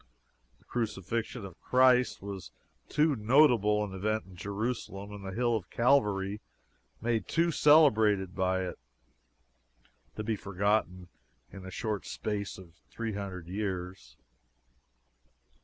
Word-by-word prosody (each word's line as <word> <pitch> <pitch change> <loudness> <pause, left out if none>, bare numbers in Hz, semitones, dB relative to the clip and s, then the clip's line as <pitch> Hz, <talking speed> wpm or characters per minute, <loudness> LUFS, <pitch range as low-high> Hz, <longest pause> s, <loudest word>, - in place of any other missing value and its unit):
The - - -29
crucifixion 115 0 -3
of 95 -3 -12
Christ 125 -3 +3
was 100 -2 -7 0.4
too 150 -1 +2
notable 110 -3 +4
an 100 -2 -5
event 110 +3 -1
in 95 -1 -14
Jerusalem, 100 +1 -4
and 105 -1 -9
the 95 - -5
Hill 120 +3 +1
of 100 -5 -4
Calvary 105 -6 +2 0.6
made 115 -3 -1
too 170 +1 +2
celebrated 110 - +4
by 95 0 0
it, 90 - -7 1.4
to 110 - -4
be 110 0 -1
forgotten 100 -2 -1 0.4
in 100 - -9
the 95 - -8
short 105 +1 -3
space 105 -2 -4
of 90 -3 -13 0.2
three 110 - -4
hundred 95 -4 -5
years. 95 -1 -5
105 Hz, 125 wpm, -30 LUFS, 95-115 Hz, 1.4 s, notable